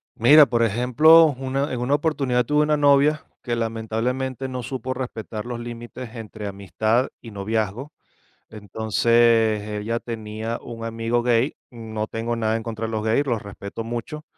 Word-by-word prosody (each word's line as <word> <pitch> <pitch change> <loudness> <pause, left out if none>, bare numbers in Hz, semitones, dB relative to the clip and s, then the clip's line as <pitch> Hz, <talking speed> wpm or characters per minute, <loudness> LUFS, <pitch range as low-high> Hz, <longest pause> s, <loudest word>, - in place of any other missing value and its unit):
Mira, 145 +6 +7
por 120 -3 0
ejemplo, 125 +9 +6
una 135 +2 -2
en 125 - -3
una 130 +4 +1
oportunidad, 140 -5 0
tuve 150 +2 +2
una 150 0 +2
novia, 145 +1 +3 0.2
que 120 -2 -2
lamentablemente, 115 +4 -2
no 125 -1 -4
supo 130 +1 -4
respetar 115 -3 -6
los 120 -1 -5
límites 120 0 -8
entre 110 -1 -7
amistad 110 +5 0
y 115 - -10
noviazgo. 110 +7 -3 0.6
Entonces, 110 +1 +2 0.2
ella 115 +2 -2
tenía 110 0 -5
un 115 -1 -8
amigo 115 +1 -1
gay, 120 +3 +1
no 110 -2 -5
tengo 115 +1 -3
nada 110 -1 0
en 115 - -4
contra 115 -1 -4
de 110 - -6
los 110 -1 -2
gays, 115 +6 +1
los 115 -4 -1
respeto 100 +2 -7
mucho. 120 +7 -6
115 Hz, 160 wpm, -23 LUFS, 110-130 Hz, 0.6 s, Mira